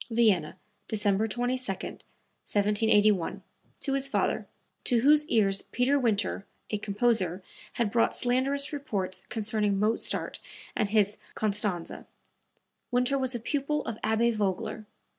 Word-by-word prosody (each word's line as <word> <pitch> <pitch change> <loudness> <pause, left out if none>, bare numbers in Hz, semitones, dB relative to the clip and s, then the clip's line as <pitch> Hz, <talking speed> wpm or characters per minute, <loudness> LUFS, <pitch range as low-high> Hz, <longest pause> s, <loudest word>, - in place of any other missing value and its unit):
(Vienna, 215 -9 +2 0.3
December 210 -1 +1
22, 245 +4 -1
1781, 205 -1 0 0.4
to 275 - -1
his 275 0 +4
father, - - 0 0.4
to 240 -2 +2
whose 300 +3 +5
ears 195 -6 +3
Peter 265 +4 +1
Winter, 215 -5 0 0.3
a 210 - -1
composer, 200 -4 0 0.3
had 230 -4 0
brought 230 +1 +2
slanderous 270 +4 +1
reports 205 -11 -3
concerning 210 -2 0
Mozart 215 +3 -1 0.4
and 210 - 0
his 205 -1 +2 0.2
Constanze. 205 -5 -1 0.8
Winter 250 +2 +2
was 260 -1 0
a - - -2
pupil 290 +5 -1
of 225 -1 -5
Abbe 220 +2 +2
Vogler. 210 0 -2
220 Hz, 120 wpm, -28 LUFS, 205-250 Hz, 0.8 s, whose